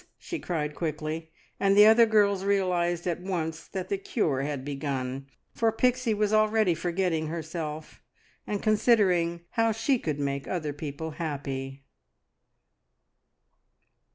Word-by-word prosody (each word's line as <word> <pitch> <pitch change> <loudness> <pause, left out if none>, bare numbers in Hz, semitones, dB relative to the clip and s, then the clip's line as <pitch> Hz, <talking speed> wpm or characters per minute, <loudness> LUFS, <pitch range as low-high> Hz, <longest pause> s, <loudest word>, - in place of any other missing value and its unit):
she 340 - -6
cried 150 -4 -2
quickly; 155 0 -4 0.3
and 195 0 +3
the 210 - +9
other 225 +1 +7
girls 200 -3 +3
realised 180 -3 +1
at 175 -1 -2
once 165 -4 -3
that 185 -1 -5
the 200 - -2
cure 160 - 0
had 140 -2 -3
begun, 135 -2 -3 0.3
for 225 -1 +2
Pixie 250 0 +1
was 210 0 +1
already 215 -3 +3
forgetting 170 -1 -1
herself, 160 -1 -5 0.5
and 205 -1 -3
considering 200 -6 +3
how 225 0 +2
she 235 +4 +1
could 150 -7 -3
make 140 -1 -2
other 155 -5 -2
people 150 +2 -5
happy! 140 -4 -5
170 Hz, 125 wpm, -27 LUFS, 150-205 Hz, 0.5 s, the